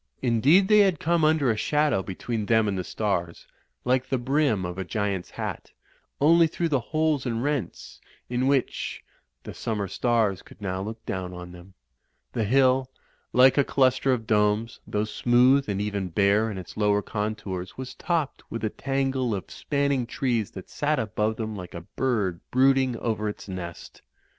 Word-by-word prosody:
Indeed 135 - +4
they 210 0 +6
had 190 -6 +4
come 170 0 +1
under 155 -5 +3
a - - 0
shadow 145 0 +1
between 105 +3 -4
them 110 -2 +3
and 100 - -1
the 90 - -2
stars, 90 -5 -2 0.4
like 125 +1 +1
the 130 - +1
brim 130 -6 +1
of 90 +1 -5
a - - -1
giant's 100 -2 -2
hat; - - -6 0.5
only 165 +3 +5
through 170 +1 -2
the 140 -4 +2
holes 155 +1 0
and 115 0 -1
rents 140 - -3 0.3
in 125 +2 0
which 135 -2 -1 0.4
the - - -8
summer 105 -3 -3
stars 110 -2 +1
could - - -17
now 95 -2 -3
look 110 +3 -7
down 90 -1 -4
on 90 0 -8
them. 90 +2 -14 0.6
The 115 - 0
hill, 130 +2 +3 0.4
like 130 +3 +6
a - - +6
cluster 130 0 +2
of 120 -3 -1
domes, 105 +1 +1
though 105 +1 -1
smooth 125 +4 +3
and 100 -1 -1
even 100 -2 -2
bare 100 +5 +2
in 105 - -5
its 90 -3 -9
lower 105 -1 +2
contours 105 -4 -4
was 130 -1 -6
topped 165 -6 -2
with 115 - -5
a 110 - 0
tangle 135 -4 -1
of 95 - -7
spanning 140 -4 -1
trees 120 -5 -1
that 95 - -9
sat 150 +1 0
above 110 -1 -1
them 110 -1 -4
like 90 -3 -8
a 85 - -5
bird 105 -10 0
brooding 130 -1 +3
over 110 -2 -1
its 105 - -8
nest. 90 -3 -8
115 Hz, 175 wpm, -26 LUFS, 100-135 Hz, 0.6 s, they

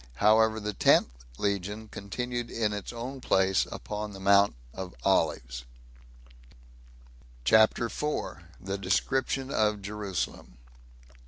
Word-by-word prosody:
However, 110 - +4
the 105 0 -3
tenth 60 - +4 0.3
legion 100 +2 -2
continued 120 +4 -4
in 110 -2 -1
its 105 -1 -5
own 125 +3 -6
place, 95 -4 +2
upon 105 0 -5
the 95 - -9
Mount 100 -2 +4 0.2
of 95 -1 -7
Olives. - - +1 1.8
CHAPTER 110 - +5
4. 150 - -3 0.2
The 95 +1 -4
Description 130 +7 0
Of 105 -3 +1
Jerusalem. 100 - -4
105 Hz, 105 wpm, -28 LUFS, 95-110 Hz, 1.8 s, CHAPTER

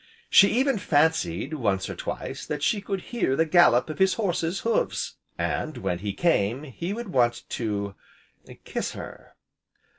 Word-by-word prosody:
She 200 - +8
even 260 -1 +2
fancied, 145 - +1
once 100 -10 0
or - - -5
twice, 135 -1 -5
that 150 -1 -3
she 205 +4 +2
could 195 -2 -3
hear 180 - +1
the 160 - +3
gallop 155 -7 +5
of 155 - -6
his 190 0 +4
horse's 180 -3 -1
hoofs. 100 - -1 0.2
And, - - -2
when 85 - -2
he 100 +1 -3
came, 125 - +1
he 160 +6 -5
would 235 0 -5
want 120 -6 +2
to 100 -3 -2 0.7
kiss - - -3
her! - - -10
155 Hz, 155 wpm, -26 LUFS, 115-190 Hz, 0.7 s, She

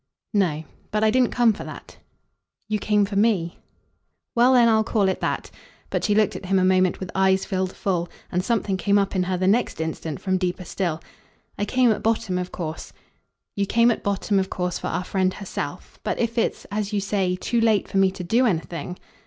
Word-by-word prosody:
"No. 170 -7 +1 0.3
But 215 0 0
I 215 - +4
didn't 255 0 +3
come 240 -3 +3
for 210 - -8
that." - - -10 0.7
"You 215 -1 -1
came 210 -1 +2
for 200 0 -6
ME." 200 -5 +1 0.7
"Well 245 +2 +5
then 230 -3 +5
call 215 -3 +1
it 190 - 0
that." - - -2 0.4
But - - -1
she 210 - +2
looked 215 -1 +2
at 185 - -7
him 195 +1 +2
a 185 - +3
moment 185 -1 +3
with 185 - -6
eyes 190 0 +2
filled 185 -1 -2
full, 175 -3 -1 0.2
and 180 +1 0
something 210 -3 0
came 200 +2 +2
up 200 0 0
in 185 - +2
her 180 0 -1
the 185 - 0
next 215 +1 +2
instant 160 -1 -4
from 185 -1 0
deeper 180 0 -2
still. 170 -3 -2 0.5
"I 205 - -1
came 250 +1 +3
at 215 - -1
bottom 220 -4 0
of 180 0 -4
course 160 -2 -6 0.3
" - - -55
"You 200 -1 0
came 235 +3 +4
at - - -2
bottom 200 0 0
of 190 0 -1
course 180 -1 -2
for - - -4
our 180 - -2
friend 185 0 0
herself. 200 - -6
But - - -1
if 230 -1 -1
it's, 230 - -1
as 210 0 -2
you 205 - 0
say, 195 -2 0
too 230 +5 -1
late 220 -3 +3
for - - -3
me 195 -1 +5
to 185 -1 -7
do 235 +8 +3
anything?" 175 -1 -3
195 Hz, 215 wpm, -24 LUFS, 185-215 Hz, 0.7 s, Well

